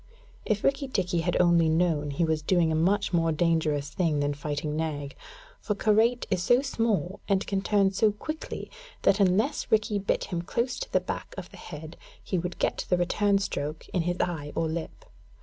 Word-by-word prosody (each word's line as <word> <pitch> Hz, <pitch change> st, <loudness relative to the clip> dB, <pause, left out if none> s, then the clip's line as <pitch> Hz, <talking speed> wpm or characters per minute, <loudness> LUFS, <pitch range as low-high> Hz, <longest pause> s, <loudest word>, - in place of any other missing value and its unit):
If 210 Hz, -1 st, 0 dB
Rikki 275 Hz, 0 st, +1 dB
tikki 180 Hz, -8 st, 0 dB
had 175 Hz, +1 st, 0 dB
only 170 Hz, -2 st, +4 dB
known, 160 Hz, -3 st, +1 dB
he 145 Hz, +4 st, 0 dB
was 160 Hz, -1 st, 0 dB
doing 165 Hz, 0 st, +2 dB
a -, -, +1 dB
much 195 Hz, +5 st, +1 dB
more 165 Hz, -1 st, +2 dB
dangerous 155 Hz, -3 st, +1 dB
thing 160 Hz, -2 st, 0 dB
than 145 Hz, 0 st, 0 dB
fighting 150 Hz, +1 st, -3 dB
Nag, 145 Hz, -3 st, -3 dB, 0.4 s
for 210 Hz, -, -2 dB
Karait 225 Hz, +4 st, +2 dB
is 185 Hz, -2 st, +1 dB
so 245 Hz, +8 st, +4 dB
small, 225 Hz, -8 st, -1 dB
and 195 Hz, -1 st, +2 dB
can 195 Hz, -1 st, -1 dB
turn 200 Hz, -1 st, +3 dB
so 210 Hz, +2 st, +3 dB
quickly, 310 Hz, +10 st, -6 dB, 0.3 s
that 200 Hz, -, +4 dB
unless 205 Hz, +9 st, +1 dB
Rikki 215 Hz, -1 st, +2 dB
bit 195 Hz, -, 0 dB
him 175 Hz, -3 st, -3 dB
close 235 Hz, +8 st, -2 dB
to -, -, -6 dB
the -, -, +3 dB
back -, -, -6 dB
of -, -, -7 dB
the -, -, -12 dB
head, 160 Hz, 0 st, -9 dB, 0.3 s
he 185 Hz, -, -1 dB
would 175 Hz, +1 st, -4 dB
get -, -, -1 dB
the 180 Hz, -, +3 dB
return 200 Hz, +3 st, +2 dB
stroke 155 Hz, -5 st, -3 dB
in 180 Hz, -, 0 dB
his 175 Hz, +2 st, -2 dB
eye 150 Hz, -4 st, -2 dB
or 165 Hz, -, 0 dB
lip. 160 Hz, +1 st, -5 dB
175 Hz, 195 wpm, -27 LUFS, 160-205 Hz, 0.4 s, only